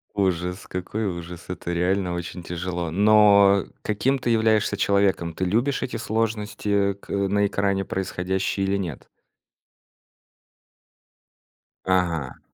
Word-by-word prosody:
Ужас 90 -1 -1
какой 100 +4 -3
ужас, 85 -2 -6
это 90 -1 -4
реально 90 +1 0
очень 85 +1 -6
тяжело! 90 0 -4
Но 100 0 +5 0.2
каким 125 +6 +1
ты 120 -1 -1
являешься 110 -2 +2
человеком? 100 -4 +1
Ты 95 - -2
любишь 120 +9 +1
эти 125 - -4
сложности 105 -2 -1
к 100 - -20
на 100 +1 +1
экране 100 -1 0
происходящие 95 +1 -2
или 100 +1 +1
нет? 85 -9 -6 2.8
Ага. 85 -7 0
95 Hz, 110 wpm, -24 LUFS, 90-105 Hz, 2.8 s, Но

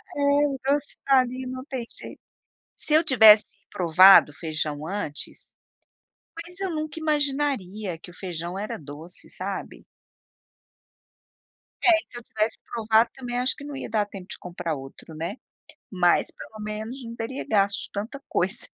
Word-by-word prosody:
É 285 - -2 0.3
o 275 -2 -3
doce 285 +1 0
tá 270 -1 +6
ali 255 +1 -2
não 255 0 -6
tem 260 -5 -5
jeito. - - -11 0.6
Se 305 - +2
eu 315 +2 +6
tivesse 220 -7 +8 0.3
provado 180 -1 +7
o 145 - -18
feijão 155 -2 -3
antes, 185 -6 -5 0.9
mas 355 +1 -11
eu 385 -1 -2
nunca 310 0 -4
imaginaria 275 - -1
que 175 - -13
o - - -18
feijão 175 -1 -5
era 210 - -4
doce, 155 +4 -10
sabe. - - -6 2.0
É, - - +4 0.2
se 240 - -9
eu 240 - -17
tivesse 215 0 -1 0.2
provado 225 0 +3
também 245 -2 -4
acho 255 +1 0
que 285 - -11
não 290 0 -7
ia 270 - -6
dar 215 -1 +1
tempo 195 -3 -10
de - - -7
comprar 170 -2 -4
outro, 135 +4 -11
né, 165 +10 -4 0.5
mas 180 -3 +3
pelo 215 - -11
menos 215 +5 -5
não 230 0 -7
teria 235 +4 -5
gasto 200 -1 +2
de - - -10
tanta 225 +8 -5
coisa. - - +2
220 Hz, 160 wpm, -25 LUFS, 180-270 Hz, 2.0 s, tivesse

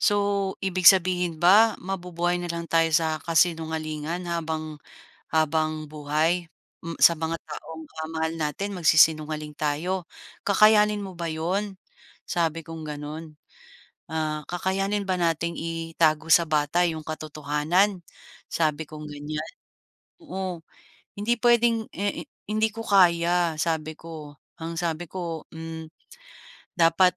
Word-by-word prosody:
so, 200 -1 +1
ibig 185 -2 +6
sabihin 180 -2 +3
ba 210 +5 +6
mabubuhay 175 -1 -2
na 175 - -4
lang 170 0 -3
tayo 165 0 +3
sa 155 -1 +2
kasinungalingan 160 0 0
habang 160 -2 -3 0.5
habang-buhay, 155 +1 0 0.4
hmm, 165 0 -6
sa 170 - +7
mga 160 +1 -2
taong, 160 +1 -9
ah, 160 0 -7
mahal 160 0 -1
natin 165 +6 -3
magsisinungaling 155 -2 +3
tayo, 165 +5 -1 0.4
kakayanin 210 +1 +5
mo 190 - -7
ba 170 -1 -3
'yon?" 185 +6 -2 0.5
Sabi 165 -1 -1
kong 165 -1 -8
ganon. 150 +1 -7 0.8
Ah, 155 -1 -2
"Kakayanin 195 +3 -1
ba 185 - +1
nating 170 0 0
itago 165 -1 0
sa 170 - +7
bata 155 +3 +2
yung 160 -1 -4
katotohanan?" 155 +5 0 0.5
Sabi 155 -1 -1
kong 155 0 -9
ganyan, 150 +2 -5 0.7
oo. 190 - -5 0.6
Hindi 225 +4 +1
pwedeng, 235 -1 +3
eh, 200 +1 -3 0.2
hindi 215 +1 +2
ko 225 +1 -6
kaya 175 -3 +3
sabi 155 -1 -1
ko, 155 -3 -10 0.2
ang 165 +1 -5
sabi 170 -1 -2
ko, 170 -3 -5
hmm, 160 0 -8 0.9
dapat 170 +2 +4
165 Hz, 120 wpm, -25 LUFS, 155-180 Hz, 0.9 s, sa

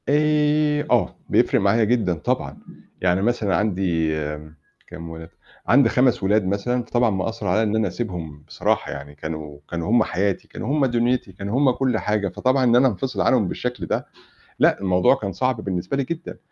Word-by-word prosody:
آآ 150 0 +2
آه، - - +2
بيفرق - - +3
معايا 100 +4 +3
جدًا 110 -5 +1
طبعًا. 80 -3 -3 0.4
يعني 90 +1 +2
مثلًا 105 -3 +1
عندي 90 -6 0 0.8
كام 85 -1 -9
ولاد، 80 0 -9 0.4
عندي 140 +3 +5
5 125 -4 +2
ولاد 105 +1 +2
مثلًا، 110 +6 -1
فطبعا 120 0 +1
مأثّر 100 +1 -3
عليّا 105 +5 +2
إن 110 0 0
أنا 110 -2 +1
أسيبهم 85 -8 -6
بصراحة - - -1
يعني 70 +1 -8
كانوا 75 -1 -7
كانوا 85 +2 -3
هم 120 - +5
حياتي، 95 +1 -2
كانوا - - -7
هم 140 - +3
دنيتي، 120 -3 0
كانوا 100 +5 -4
هم 140 -2 +4
كل 125 -2 0
حاجة، 105 -2 -1
فطبعًا 130 +7 +1
إن 120 -1 +4
أنا 130 +2 +5
انفصِل 130 +3 -2
عنهم 115 -7 +3
بالشكل 125 +6 -4
ده - - -2 0.5
لأ، - - +4
الموضوع 95 +4 +3
كان 105 -7 -4
صعب 125 0 -1
بالنسبة 95 +6 -2
لي 140 - +1
جدًا. 165 +5 -6
105 Hz, 175 wpm, -22 LUFS, 90-125 Hz, 0.8 s, عندي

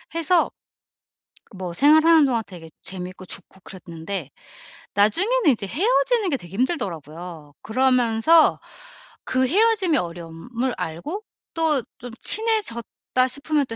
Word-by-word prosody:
해서 335 +1 +2 1.1
뭐 180 -2 -5
생활하는 315 - +6
동안 235 -4 0
되게 165 -4 -11
재밌고 185 0 -7
좋고 190 +1 -9
그랬는데 175 -3 -7 0.7
나중에는 360 - +3
인제 220 -6 +1
헤어지는 460 - +1
게 - - +2
되게 175 -4 -13
힘들더라고요. 170 - -4
그러면서 255 +5 +3 0.7
그 260 0 +1
헤어짐의 400 - +3
어려움을 175 +9 -4
알고 295 - -5 0.3
또 315 -5 +1 0.2
좀 245 0 -8
친해졌다 435 - +1 0.5
싶으면 285 +2 0
또 225 - -6
245 Hz, 280 characters per minute, -23 LUFS, -, 1.1 s, 생활하는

